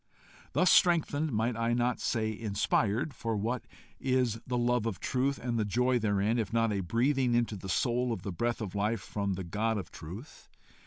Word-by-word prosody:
Thus 185 Hz, -, +4 dB
strengthened 160 Hz, -4 st, +3 dB
might 115 Hz, +1 st, 0 dB
I 115 Hz, +1 st, 0 dB
not 120 Hz, 0 st, +1 dB
say 110 Hz, -1 st, -1 dB
inspired? 105 Hz, +4 st, 0 dB
for 115 Hz, -3 st, -2 dB
what 115 Hz, +4 st, -2 dB, 0.3 s
is 125 Hz, -4 st, +1 dB
the 125 Hz, -1 st, -1 dB
love 120 Hz, -1 st, +1 dB
of 110 Hz, -, -3 dB
truth 135 Hz, +2 st, 0 dB
and 115 Hz, -1 st, -2 dB
the -, -, +2 dB
joy 125 Hz, +4 st, +2 dB
therein, 105 Hz, +1 st, +1 dB
if 105 Hz, -3 st, -2 dB
not 115 Hz, -1 st, +2 dB
a 100 Hz, -, -1 dB
breathing 120 Hz, +6 st, +1 dB
into 120 Hz, -2 st, +1 dB
the 95 Hz, -1 st, -8 dB
soul 125 Hz, +3 st, +1 dB
of 115 Hz, -, -4 dB
the 100 Hz, -, -3 dB
breath 120 Hz, +7 st, -1 dB
of 100 Hz, -4 st, -4 dB
life 105 Hz, +1 st, 0 dB
from 100 Hz, -2 st, -2 dB
the 95 Hz, -, -4 dB
God 105 Hz, +6 st, -1 dB
of 100 Hz, -, -6 dB
truth? 95 Hz, -, -10 dB
115 Hz, 195 wpm, -30 LUFS, 105-125 Hz, 0.3 s, Thus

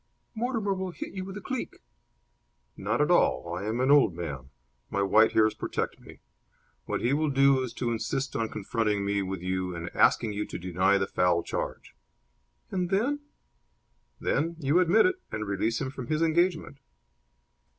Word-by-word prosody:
"Mortimer 225 Hz, -3 st, -1 dB
will 190 Hz, -1 st, -3 dB
hit 175 Hz, -, -7 dB
you 190 Hz, -1 st, -4 dB
with 190 Hz, +1 st, -7 dB
a -, -, -7 dB
cleek." 260 Hz, +2 st, -4 dB, 1.0 s
"Not -, -, -1 dB
at -, -, +2 dB
all. 85 Hz, 0 st, +2 dB
I 95 Hz, +3 st, -4 dB
am 110 Hz, +3 st, -1 dB
an 130 Hz, +2 st, +3 dB
old 140 Hz, -, +5 dB
man. 70 Hz, -7 st, -6 dB, 0.4 s
My 100 Hz, -, 0 dB
white 110 Hz, +3 st, +4 dB
hairs 110 Hz, -1 st, +4 dB
protect 110 Hz, -, -3 dB
me. -, -, -15 dB, 0.6 s
What -, -, -2 dB
he 120 Hz, +3 st, +1 dB
will 155 Hz, +1 st, +1 dB
do 135 Hz, -1 st, +4 dB
is 130 Hz, -2 st, -3 dB
to 120 Hz, -2 st, -2 dB
insist 135 Hz, +4 st, -2 dB
on 115 Hz, -1 st, -1 dB
confronting 105 Hz, -1 st, -1 dB
me 100 Hz, 0 st, 0 dB
with 95 Hz, -2 st, -4 dB
you 90 Hz, -1 st, -2 dB
and 85 Hz, +1 st, -6 dB
asking 110 Hz, -2 st, +3 dB
you 105 Hz, +1 st, -3 dB
to -, -, -6 dB
deny 90 Hz, +2 st, +2 dB
the 95 Hz, -, 0 dB
foul 90 Hz, -3 st, +1 dB
charge." -, -, -5 dB, 0.8 s
"And 180 Hz, -2 st, -1 dB
then?" 235 Hz, +10 st, +1 dB, 1.0 s
"Then 165 Hz, +3 st, 0 dB
you 150 Hz, +2 st, +2 dB
admit 185 Hz, +5 st, +5 dB
it 370 Hz, 0 st, 0 dB
and 105 Hz, -1 st, -3 dB
release 105 Hz, +3 st, -1 dB
him 135 Hz, -2 st, -3 dB
from 130 Hz, -3 st, -7 dB
his 155 Hz, +3 st, +1 dB
engagement." 165 Hz, -3 st, +1 dB
120 Hz, 175 wpm, -28 LUFS, -, 1.0 s, old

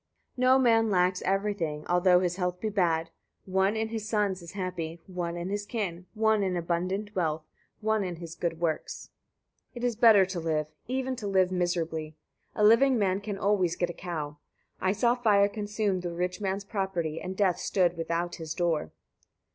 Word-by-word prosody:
69. 255 Hz, -1 st, +1 dB
No 260 Hz, -, +7 dB
man 225 Hz, -3 st, +4 dB
lacks 180 Hz, -1 st, +2 dB
everything, 190 Hz, -6 st, -1 dB
although 180 Hz, 0 st, +4 dB
his 180 Hz, -1 st, -1 dB
health 180 Hz, -1 st, -1 dB
be 220 Hz, -, -2 dB
bad: 165 Hz, -5 st, +1 dB, 0.3 s
one 190 Hz, +3 st, +1 dB
in 220 Hz, 0 st, -1 dB
his 220 Hz, -1 st, -4 dB
sons 205 Hz, -4 st, 0 dB
is 170 Hz, -, -10 dB
happy, 175 Hz, -4 st, -4 dB
one 175 Hz, -2 st, -4 dB
in 175 Hz, +2 st, -4 dB
his 205 Hz, +1 st, -2 dB
kin, 190 Hz, -5 st, -4 dB
one 220 Hz, -1 st, +3 dB
in 185 Hz, -2 st, 0 dB
abundant 185 Hz, +5 st, -2 dB
wealth, 160 Hz, -3 st, 0 dB, 0.4 s
one 220 Hz, -1 st, +1 dB
in 180 Hz, -2 st, -3 dB
his 165 Hz, -1 st, -8 dB
good 170 Hz, -1 st, -3 dB
works. 160 Hz, -3 st, -3 dB, 0.6 s
70. 240 Hz, -, -7 dB
It -, -, -7 dB
is 240 Hz, -, -2 dB
better 215 Hz, -4 st, +7 dB
to 185 Hz, -1 st, -4 dB
live, 160 Hz, -2 st, 0 dB, 0.2 s
even 260 Hz, +1 st, -1 dB
to 215 Hz, -4 st, -4 dB
live 190 Hz, -2 st, +3 dB
miserably; 165 Hz, -4 st, -1 dB, 0.4 s
a 210 Hz, -, +1 dB
living 240 Hz, +5 st, +6 dB
man 195 Hz, -2 st, +1 dB
can 205 Hz, -1 st, -4 dB
always 195 Hz, -4 st, +1 dB
get 175 Hz, -1 st, -1 dB
a -, -, -11 dB
cow. 155 Hz, -5 st, -5 dB, 0.4 s
I 185 Hz, -, +1 dB
saw 235 Hz, +4 st, +2 dB
fire 210 Hz, -5 st, +4 dB
consume 205 Hz, -2 st, -1 dB
the 175 Hz, -1 st, -4 dB
rich 180 Hz, +4 st, -3 dB
man's 195 Hz, 0 st, -1 dB
property, 190 Hz, -6 st, -2 dB
and 185 Hz, +1 st, -5 dB
death 190 Hz, -4 st, +2 dB
stood 180 Hz, -3 st, +1 dB
without 170 Hz, +1 st, -2 dB
his 160 Hz, -2 st, -5 dB
door. 170 Hz, -3 st, 0 dB
185 Hz, 185 wpm, -28 LUFS, 170-210 Hz, 0.6 s, No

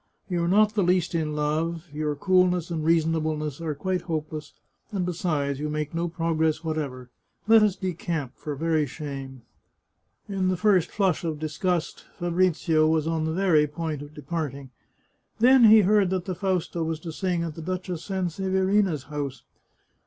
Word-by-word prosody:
" -, -, -41 dB
You 175 Hz, -1 st, +1 dB
are -, -, 0 dB
not 210 Hz, +3 st, +4 dB
the 210 Hz, -, +1 dB
least 180 Hz, -1 st, +2 dB
in 155 Hz, -2 st, -1 dB
love; 160 Hz, +3 st, -1 dB
your 150 Hz, 0 st, -2 dB
coolness 180 Hz, +1 st, +2 dB
and 160 Hz, -2 st, -2 dB
reasonableness 155 Hz, -2 st, 0 dB
are 155 Hz, -3 st, -2 dB
quite 185 Hz, +5 st, -1 dB
hopeless, 155 Hz, -2 st, -5 dB, 0.4 s
and 190 Hz, -4 st, -1 dB
besides, 155 Hz, -6 st, -1 dB
you 150 Hz, +1 st, -2 dB
make 150 Hz, 0 st, -3 dB
no 170 Hz, +1 st, -1 dB
progress 160 Hz, -1 st, 0 dB
whatsoever. 140 Hz, -6 st, -4 dB, 0.4 s
Let 225 Hz, 0 st, +7 dB
us 210 Hz, -3 st, +3 dB
decamp, 165 Hz, -6 st, -3 dB
for 150 Hz, -1 st, -5 dB
very 160 Hz, 0 st, +1 dB
shame." 135 Hz, -3 st, -7 dB, 0.8 s
In 195 Hz, -2 st, -1 dB
the 185 Hz, -1 st, +1 dB
first 195 Hz, -3 st, +3 dB
flush 190 Hz, -6 st, 0 dB
of 160 Hz, -2 st, -2 dB
disgust, 165 Hz, +3 st, -2 dB
Fabrizio 170 Hz, -2 st, +2 dB
was 160 Hz, -1 st, +2 dB
on 160 Hz, -1 st, -1 dB
the 160 Hz, -, -1 dB
very 165 Hz, -5 st, +3 dB
point 155 Hz, -1 st, -4 dB
of 145 Hz, +1 st, -11 dB
departing. 140 Hz, -3 st, -5 dB, 0.7 s
Then 250 Hz, +2 st, +6 dB
he 220 Hz, 0 st, +8 dB
heard 200 Hz, -1 st, +3 dB
that 185 Hz, -1 st, -2 dB
the 185 Hz, -, -2 dB
Fausta 180 Hz, -2 st, -1 dB
was 160 Hz, -1 st, -2 dB
to 165 Hz, -, -6 dB
sing 175 Hz, 0 st, -1 dB
at 165 Hz, -2 st, -4 dB
the 165 Hz, -, -8 dB
Duchess 180 Hz, 0 st, -4 dB
Sanseverina's 190 Hz, -2 st, 0 dB
house. 145 Hz, -3 st, -5 dB
165 Hz, 165 wpm, -26 LUFS, 150-185 Hz, 0.8 s, he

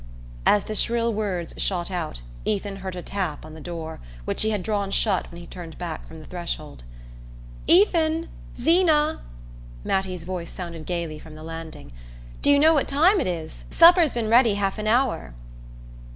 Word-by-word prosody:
As 205 Hz, -, +5 dB
the 215 Hz, -, -5 dB
shrill 230 Hz, +2 st, +1 dB
words 195 Hz, -5 st, -2 dB
shot 180 Hz, -1 st, -1 dB
out 160 Hz, -, -4 dB, 0.2 s
Ethan 200 Hz, -1 st, -2 dB
heard 190 Hz, -1 st, -6 dB
a 180 Hz, -, -6 dB
tap 180 Hz, -7 st, -3 dB
on 155 Hz, -, -11 dB
the 160 Hz, -, -10 dB
door, 165 Hz, -1 st, -6 dB, 0.3 s
which -, -, -1 dB
he 220 Hz, -, +3 dB
had 210 Hz, -4 st, -1 dB
drawn 205 Hz, -2 st, -1 dB
shut 195 Hz, -1 st, +1 dB
when 170 Hz, -, -10 dB
he 175 Hz, -, -10 dB
turned 170 Hz, -2 st, -9 dB
back 170 Hz, -3 st, -6 dB
from 160 Hz, -, -11 dB
the 155 Hz, -, -11 dB
threshold. 170 Hz, -, -5 dB, 0.9 s
"Ethan 330 Hz, -3 st, +4 dB, 0.3 s
Zeena!" 315 Hz, +1 st, +3 dB, 0.6 s
Mattie's 185 Hz, -3 st, -1 dB
voice 175 Hz, -1 st, -5 dB
sounded 170 Hz, -3 st, -7 dB
gaily 170 Hz, -3 st, -3 dB
from 155 Hz, 0 st, -12 dB
the 155 Hz, -, -10 dB
landing, 165 Hz, -, -8 dB, 0.5 s
"do -, -, +3 dB
you 285 Hz, -, +7 dB
know 315 Hz, +3 st, +6 dB
what 290 Hz, -, +2 dB
time 340 Hz, +9 st, +4 dB
it -, -, -1 dB
is? 165 Hz, -3 st, -5 dB
Supper's 335 Hz, -4 st, +6 dB
been 230 Hz, -2 st, -1 dB
ready 230 Hz, -1 st, +5 dB
half 200 Hz, +1 st, -1 dB
an 215 Hz, -, -3 dB
hour." 225 Hz, -, +1 dB
195 Hz, 175 wpm, -24 LUFS, 170-240 Hz, 0.9 s, you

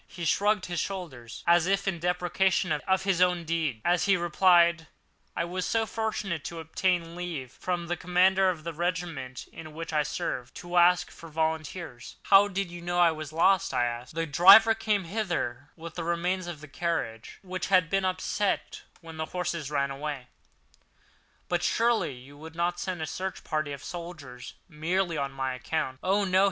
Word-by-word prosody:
He 175 Hz, -2 st, -7 dB
shrugged 205 Hz, +4 st, +2 dB
his 175 Hz, -1 st, -3 dB
shoulders, 145 Hz, -12 st, -6 dB
as 170 Hz, 0 st, +4 dB
if 195 Hz, +1 st, +1 dB
in 180 Hz, -3 st, -1 dB
depreciation 180 Hz, +2 st, +1 dB
of 190 Hz, +5 st, +1 dB
his 190 Hz, -2 st, +1 dB
own 180 Hz, -1 st, +3 dB
deed, 160 Hz, -8 st, -1 dB
as 175 Hz, -1 st, +3 dB
he 195 Hz, -1 st, +4 dB
replied: 170 Hz, -1 st, +4 dB, 0.5 s
"I -, -, 0 dB
was 180 Hz, +1 st, -3 dB
so 225 Hz, +3 st, +1 dB
fortunate 215 Hz, -7 st, -3 dB
as -, -, -6 dB
to 170 Hz, -, -7 dB
obtain 170 Hz, +1 st, -1 dB
leave 165 Hz, -8 st, -5 dB
from 175 Hz, +3 st, -3 dB
the 175 Hz, +1 st, -2 dB
commander 185 Hz, +2 st, +3 dB
of 165 Hz, -4 st, -3 dB
the 170 Hz, 0 st, -4 dB
regiment 165 Hz, -6 st, -3 dB
in 155 Hz, -1 st, -10 dB
which 165 Hz, 0 st, -6 dB
I 150 Hz, -, +3 dB
served, 130 Hz, -3 st, -4 dB
to 175 Hz, 0 st, -4 dB
ask 180 Hz, +1 st, +4 dB
for 165 Hz, -, -12 dB
volunteers." 160 Hz, -3 st, -3 dB
"But -, -, -15 dB
how 200 Hz, +1 st, +8 dB
did 195 Hz, -2 st, -3 dB
you 175 Hz, 0 st, -8 dB
know 175 Hz, +1 st, -2 dB
I 175 Hz, -1 st, +6 dB
was 155 Hz, -1 st, -6 dB
lost?" 190 Hz, +4 st, +3 dB
I 120 Hz, -, +3 dB
asked. 120 Hz, +4 st, -5 dB
"The 165 Hz, 0 st, 0 dB
driver 195 Hz, +9 st, +8 dB
came 215 Hz, -3 st, 0 dB
hither 170 Hz, -, -3 dB
with 165 Hz, -1 st, -9 dB
the 170 Hz, -, -4 dB
remains 175 Hz, +2 st, -1 dB
of 165 Hz, -4 st, -7 dB
his 150 Hz, -, -12 dB
carriage, 155 Hz, -11 st, -3 dB
which 185 Hz, -1 st, -4 dB
had 185 Hz, -3 st, +4 dB
been 195 Hz, +2 st, 0 dB
upset 190 Hz, +2 st, -1 dB, 0.2 s
when 165 Hz, -1 st, -10 dB
the 155 Hz, -, -2 dB
horses 170 Hz, -4 st, -3 dB
ran 140 Hz, -2 st, 0 dB
away." 135 Hz, -2 st, -5 dB, 1.2 s
"But 175 Hz, -1 st, 0 dB
surely 230 Hz, -, +1 dB
you 130 Hz, +3 st, -14 dB
would 160 Hz, +2 st, -11 dB
not 175 Hz, +1 st, -1 dB
send 180 Hz, -4 st, -3 dB
a -, -, -1 dB
search 185 Hz, +4 st, -5 dB
party 155 Hz, -2 st, -2 dB
of 140 Hz, -2 st, -7 dB
soldiers 155 Hz, -8 st, -8 dB
merely 170 Hz, +2 st, -1 dB
on 140 Hz, -2 st, -3 dB
this 130 Hz, -1 st, -2 dB
account?" 130 Hz, 0 st, -3 dB
"Oh, 195 Hz, +2 st, +2 dB
no!" 185 Hz, 0 st, +3 dB
170 Hz, 190 wpm, -28 LUFS, 155-185 Hz, 1.2 s, how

